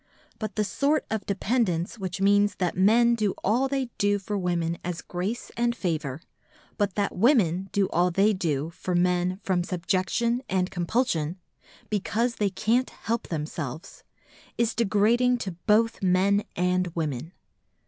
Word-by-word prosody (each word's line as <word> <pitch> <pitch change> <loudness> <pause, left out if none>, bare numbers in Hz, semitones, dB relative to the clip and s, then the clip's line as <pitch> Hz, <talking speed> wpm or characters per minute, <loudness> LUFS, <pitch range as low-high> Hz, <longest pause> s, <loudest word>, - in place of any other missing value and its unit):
But 215 -3 -4
the 215 - +1
sort 285 +8 +1
of 220 -3 -2
dependence 200 -2 0
which 190 0 -4
means 205 0 +3
that 180 -2 -1
men 230 +5 +5
do 215 -4 0
all 240 +7 +2
they 265 -3 -2
do 205 0 +3
for 205 +1 -4
women 170 -3 -1
as 175 -1 -3
grace 190 +7 -4
and 235 0 +1
favour, 155 - -3 0.6
but 205 -3 0
that 205 -1 -1
women 195 - +3
do 200 -1 +2
all 175 +2 +2
they 195 +5 +3
do 160 -5 -1
for 180 +1 -3
men 180 +1 +1
from 180 -2 +1
subjection 185 +7 0
and 185 -1 0
compulsion,—because 200 - -2
they 205 -2 +1
can't 225 +6 +1
help 230 0 -3
themselves,—is 160 - -5
degrading 230 +3 +3
to 200 -5 -4 0.2
both 225 +2 +3
men 195 +2 +2
and 180 +1 +1
women. 155 -1 -3
195 Hz, 140 wpm, -26 LUFS, 180-225 Hz, 0.6 s, men